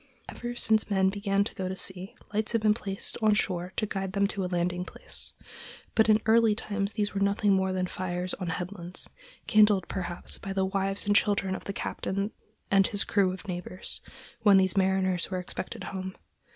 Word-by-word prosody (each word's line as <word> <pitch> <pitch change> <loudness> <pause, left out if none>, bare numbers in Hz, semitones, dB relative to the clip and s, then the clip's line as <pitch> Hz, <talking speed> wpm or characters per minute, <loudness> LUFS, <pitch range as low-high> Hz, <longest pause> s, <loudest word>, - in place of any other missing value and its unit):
Ever 240 0 -6
since 220 -2 +3
men 190 -2 +3
began 200 0 +1
to 205 - -5
go 185 -1 -3
to 190 - -3
sea 190 0 -2 0.2
lights 215 +2 0
have 230 - +2
been 210 -1 +5
placed 195 -3 -3
on 215 -1 +4
shore 180 -3 -1
to - - 0
guide 195 -2 -3
them 200 0 +2
to 200 -2 -2
a - - -1
landing 180 0 0
place; - - -3 0.6
but 220 0 +4
in 215 0 +6
early 225 -1 +5
times 205 -1 -2
these 205 -1 -1
were 200 - -2
nothing 200 0 +3
more 190 0 +2
than 185 0 0
fires 180 0 -3
on 185 - -4
headlands, 175 +1 -4 0.4
kindled, 210 -3 +4
perhaps, 175 -2 -3
by 195 - -5
the 190 -1 +1
wives 195 +1 +1
and 205 0 +2
children 200 -2 +2
of - - -6
the - - -3
captain 200 +1 -2 0.4
and 195 -1 +5
his 205 - +1
crew 195 -3 +2
of 190 +3 -8
neighbors, 180 0 -5 0.4
when 205 -3 +7
these 190 -2 +3
mariners 190 -2 +2
were 185 - -2
expected 180 0 -5
home. 190 -1 -5
195 Hz, 195 wpm, -28 LUFS, 185-205 Hz, 0.6 s, when